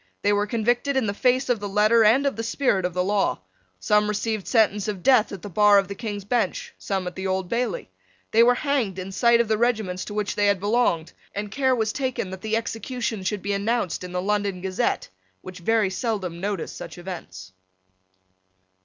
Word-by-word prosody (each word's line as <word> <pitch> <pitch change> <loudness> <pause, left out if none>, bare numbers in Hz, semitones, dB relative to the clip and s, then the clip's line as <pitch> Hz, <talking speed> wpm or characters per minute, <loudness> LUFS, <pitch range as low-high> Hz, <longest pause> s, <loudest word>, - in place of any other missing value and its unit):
They 205 - +3
were 205 0 +1
convicted 240 +5 0
in 260 - +2
the 200 - -1
face 255 +4 +2
of 245 -3 +1
the 205 0 -5
letter 215 +3 +4
and 240 +7 +4
of 280 - +1
the 225 - -3
spirit 225 -5 0
of 180 -1 -3
the 180 - +1
law. 200 - 0 0.4
Some 210 - +2
received 210 -1 -2
sentence 210 -3 +2
of 200 -4 -4
death 255 -5 +4
at 195 -4 -8
the - - -5
bar 205 +2 +5
of 195 -1 +2
the - - -3
King's 205 -1 -5
Bench, 240 +2 -1
some 190 -2 -2
at 180 - -4
the 190 0 -3
Old 190 -1 -1
Bailey. 235 -5 -2 0.4
They 225 - +5
were 245 +1 +6
hanged 255 -10 -1
in 185 +1 -5
sight 235 +4 +4
of 235 - +2
the 215 0 +1
regiments 215 -6 0
to 205 - -7
which 210 -1 -1
they 205 0 +2
had 200 -2 +2
belonged; 205 -6 +1 0.2
and 205 0 -4
care 260 +2 +2
was 220 -2 -1
taken 255 -8 -2
that 190 0 -7
the 220 0 0
executions 225 -3 -3
should 210 -1 -2
be 200 +1 -1
announced 200 -3 -1
in 180 - -7
the 180 0 -2
London 205 -2 0
Gazette, 190 0 -1 0.3
which 185 0 -9
very 215 +1 +1
seldom 190 -5 -3
noticed 200 -3 -3
such - - -8
events. 95 - -8
210 Hz, 210 wpm, -24 LUFS, 190-230 Hz, 0.4 s, were